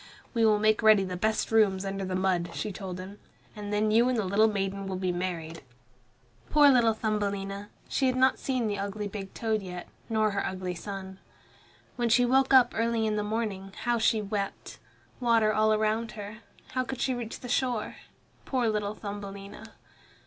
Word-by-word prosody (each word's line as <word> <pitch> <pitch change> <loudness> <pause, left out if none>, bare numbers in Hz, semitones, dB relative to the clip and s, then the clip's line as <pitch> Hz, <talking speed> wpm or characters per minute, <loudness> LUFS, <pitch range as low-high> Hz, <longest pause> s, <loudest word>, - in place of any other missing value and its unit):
"We 230 -2 +2
will 215 -1 +5
make 215 +1 +3
ready 215 -3 +6
the 185 -1 -4
best 215 +5 0
rooms 200 -4 +3
under 195 0 -3
the 185 -1 -2
mud," 185 -2 0
she 210 - -3
told 185 -2 -6
him, 195 +3 -9 0.4
"and 205 -1 -6
then 210 +1 +1
you 235 +3 +4
and 255 - +1
the 215 - 0
little 200 +4 +4
maiden 195 -1 -2
will 190 - -3
be 185 -1 -1
married." 175 -2 -4 0.9
Poor 295 -1 +6
little 235 -4 +4
Thumbelina! 200 -2 -2 0.2
She 265 - +1
had 255 - +1
not 260 0 +3
seen 255 -3 -1
the 205 -2 -2
ugly 200 +1 -3
big 195 -1 -7
toad 220 -2 0
yet, 180 -2 -7 0.2
nor 215 -1 +2
her 200 - -1
ugly 185 -1 -3
son. 190 +1 -7 0.8
When 240 -1 +1
she 245 +2 +5
woke 265 +2 +3
up 260 -2 +6
early 230 0 +1
in 215 -1 0
the 210 - 0
morning, 210 -3 -3
how 240 -1 +1
she 220 -1 +2
wept! 200 -1 -4 0.4
Water 230 -3 +3
all 215 +1 +3
around 215 +1 0
her! 210 0 -8 0.3
How 255 0 -1
could 255 0 -6
she 260 - +1
reach 240 -2 -6
the 250 - -7
shore? 245 -2 -1 0.5
Poor 255 -3 0
little 210 -1 -2
Thumbelina! 200 +1 -8
210 Hz, 185 wpm, -28 LUFS, 195-225 Hz, 0.9 s, ready